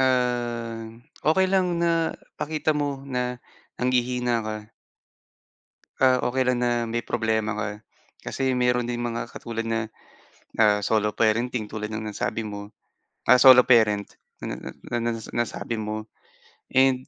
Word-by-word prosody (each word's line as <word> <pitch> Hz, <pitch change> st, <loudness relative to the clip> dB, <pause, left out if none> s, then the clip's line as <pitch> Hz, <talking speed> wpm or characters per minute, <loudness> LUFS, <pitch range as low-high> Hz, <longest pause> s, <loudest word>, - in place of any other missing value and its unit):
ah, 120 Hz, -3 st, 0 dB, 0.4 s
okey 190 Hz, +4 st, +4 dB
lang 185 Hz, -2 st, +2 dB
na 170 Hz, -1 st, +1 dB, 0.2 s
pakita 155 Hz, +1 st, 0 dB
mo 145 Hz, -2 st, -2 dB
na 125 Hz, -2 st, -2 dB, 0.4 s
nanghihina 125 Hz, -1 st, +1 dB
ka. 110 Hz, -1 st, -4 dB, 1.5 s
Ah 130 Hz, -1 st, +5 dB
okey 130 Hz, +2 st, +1 dB
lang 125 Hz, -1 st, +1 dB
na 120 Hz, 0 st, +1 dB, 0.2 s
may 120 Hz, 0 st, -2 dB
problema 110 Hz, -2 st, 0 dB
ka, 105 Hz, 0 st, -2 dB, 0.6 s
kasi 135 Hz, 0 st, -1 dB
meron 125 Hz, -1 st, +2 dB
din 120 Hz, -, -2 dB
mga 120 Hz, -1 st, -3 dB
katulad 115 Hz, -1 st, -5 dB
na, 115 Hz, 0 st, -1 dB, 0.7 s
ah, 105 Hz, -2 st, +4 dB
solo 105 Hz, 0 st, +1 dB
parenting 115 Hz, 0 st, +1 dB
tulad 105 Hz, 0 st, -5 dB
ng 110 Hz, -, -3 dB
nasabi 110 Hz, +1 st, -3 dB
mo, 105 Hz, -1 st, -7 dB, 0.6 s
ah, 125 Hz, -, +9 dB
solo 130 Hz, 0 st, +9 dB
parent 110 Hz, -5 st, +4 dB, 0.3 s
na -, -, -4 dB
na -, -, -8 dB
na 120 Hz, -, -6 dB
na 120 Hz, -, +1 dB
nas 115 Hz, -1 st, -7 dB
nasabi 120 Hz, 0 st, -2 dB
mo. 110 Hz, 0 st, -4 dB, 0.7 s
And 130 Hz, -1 st, +4 dB
120 Hz, 140 wpm, -25 LUFS, 110-130 Hz, 1.5 s, ah